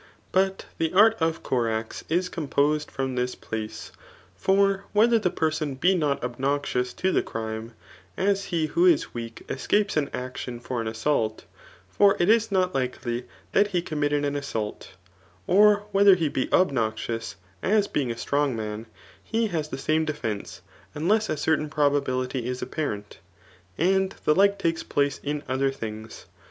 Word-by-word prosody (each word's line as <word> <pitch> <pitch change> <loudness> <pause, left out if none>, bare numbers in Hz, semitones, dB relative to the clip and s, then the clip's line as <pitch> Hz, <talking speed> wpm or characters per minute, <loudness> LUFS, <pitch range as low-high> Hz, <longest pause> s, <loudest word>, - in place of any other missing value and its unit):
But 190 +1 +1
the 160 +1 0
art 215 +3 +6
of 160 0 0
Corax 115 -3 -1
is 175 +3 +1
composed 150 -2 0
from 135 -1 -3
this 125 0 -1
place* 110 0 -6 0.4
For 195 0 +2
whether 225 +2 +5
the 185 - +1
person 155 -4 -1
be 180 +8 +3
not 150 -8 0
obnoxious 125 0 -1
to 190 - 0
the - - +2
crithe; 110 0 -5 0.5
as 200 +1 +1
he 170 -4 0
who 345 - +3
is 330 -2 +3
weak 115 -1 -7
escapes 205 -1 0
an 145 -2 +1
action 125 -1 -5
for 120 0 -3
an 115 - -4
assauk; 110 -1 0 0.5
fi>r 200 - +4
it 175 - +3
is 225 -1 +4
not 185 -1 +1
likdy 125 -2 -2 0.3
that 205 - +4
he 180 -4 0
committed 145 -3 0
an 145 0 -1
assault; 115 -10 -4 0.5
or 205 +2 +5
whether 200 -1 +6
he 165 -4 0
be 130 - -1
obnon>tts, 115 -7 0 0.3
as 205 0 +2
being 135 -4 -1
a 115 - -3
strong 140 +1 0
man, 110 0 -5 0.4
he 225 -1 0
has 155 -4 -2
the 130 - -5
same 155 +3 +1
defence, 115 -10 -4 0.3
unless 210 +9 +1
a - - -1
certain 150 0 +1
probability 135 -4 0
is 125 0 -3
apparent. 105 - -4 0.6
And 190 +3 +2
the 150 - +5
like 200 +3 +4
takes 165 -4 0
place 140 -1 0
in 145 0 -3
odier 135 +1 0
things. 110 -4 -7
145 Hz, 160 wpm, -25 LUFS, 125-190 Hz, 0.6 s, art